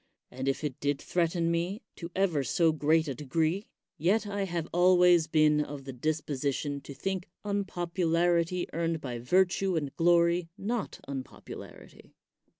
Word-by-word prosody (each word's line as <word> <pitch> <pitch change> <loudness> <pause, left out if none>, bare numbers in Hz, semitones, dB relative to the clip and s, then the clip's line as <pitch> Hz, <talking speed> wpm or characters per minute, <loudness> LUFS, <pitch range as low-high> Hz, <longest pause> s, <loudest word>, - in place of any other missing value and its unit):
And 130 +2 -5
if 135 +3 0
it 145 -4 -3
did 145 -1 0
threaten 170 -1 0
me 175 +7 -2
to 170 - -6
ever 175 -7 +2
so 165 +6 +3
great 155 +1 +2
a 140 - -2
degree, 160 - -1 0.3
yet 200 +7 +2
I 200 -1 -2
have 170 -3 -3
always 175 -2 +5
been 155 -1 +4
of 145 -1 -8
the 135 0 -7
disposition 145 0 -2
to 140 0 -10
think 190 +1 -3 0.2
unpopu 185 -3 -2
larity 170 +1 +2
earned 165 0 -1
by 125 -5 -5
virtue 185 +7 +2
and 145 -4 -2
glory 170 0 +3
not 220 +2 -3
unpopu 135 -2 -7
larity. - - -13
165 Hz, 150 wpm, -29 LUFS, 145-180 Hz, 0.3 s, always